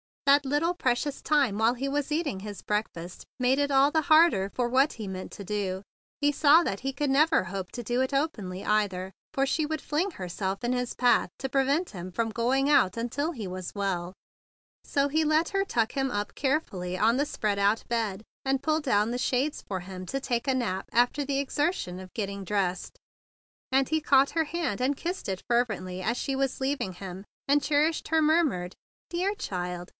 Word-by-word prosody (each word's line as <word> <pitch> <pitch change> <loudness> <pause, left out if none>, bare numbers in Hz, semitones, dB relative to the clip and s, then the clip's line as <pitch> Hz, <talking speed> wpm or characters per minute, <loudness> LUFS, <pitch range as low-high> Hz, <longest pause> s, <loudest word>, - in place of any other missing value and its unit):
That 280 +1 +5
little 295 +6 +1
precious 270 -2 -1
time 280 -9 +2
while 225 +2 +4
he 270 +3 -3
was 290 +1 -1
eating 300 - -1
his 205 0 -7
breakfast 180 -5 -3
made 255 +2 +2
it 285 0 +1
all 275 +1 +4
the 315 0 +2
harder 310 - +5
for 245 -1 +1
what 270 +4 +3
he 220 - -7
meant 185 -1 -6
to 200 - -8
do. 195 -1 -2 0.4
He 290 0 +4
saw 300 +3 +6
that 195 - -2
he 270 +1 -3
could 290 +1 -1
never 305 - +4
hope 185 0 -5
to 240 - -5
do 240 +3 -1
it 260 +1 -1
openly, 210 - -2
either; 190 -3 0 0.2
for 275 - +2
she 310 +3 0
would 310 -1 -3
fling 335 +7 -1
herself 190 - -4
in 240 - 0
his 250 -1 -2
path 245 -1 +3
to 265 - -3
prevent 275 +6 +1
him 185 -2 -7
from 225 +4 -1
going 255 +5 +1
out 200 -10 +4
until 270 +8 -2
he 225 -8 -6
was 185 +1 -6
well; 185 -3 -2 0.7
so 280 0 +1
he 315 +3 +2
let 310 +2 +2
her 390 0 0
tuck 230 - 0
him 270 -1 -1
up 205 -4 -3
carefully 195 - -1
on 225 +5 +3
the 285 - +2
spread 210 -8 -1
up 205 +3 +2
bed, 220 -4 -1 0.2
and 270 0 0
pull 310 0 +2
down 225 -7 +1
the 245 - -1
shades 260 +4 0
for 190 -2 -3
him 185 0 -8
to 275 - -2
take 245 -1 -1
a 265 - +2
nap 195 -7 -1
after 245 +5 +2
the 275 0 0
exertion 280 - -1
of 185 -1 -11
getting 200 -2 -4
dressed; 190 -2 -1 0.7
and 265 0 +3
he 315 0 +2
caught 275 -1 +4
her 325 -1 +1
hand, 320 - -2
and 270 +2 +1
kissed 355 +3 -4
it 190 -1 -3
fervently 215 -7 0
as 225 +5 0
she 275 +1 -2
was 270 -1 -1
leaving 265 -8 -1
him; 190 +1 -8 0.2
and 290 +1 +4
cherished 300 +3 +1
her 320 0 +2
murmured 300 - +2 0.4
"Dear 370 +4 -1
child!" 180 - -4
250 Hz, 200 wpm, -28 LUFS, 195-290 Hz, 0.7 s, saw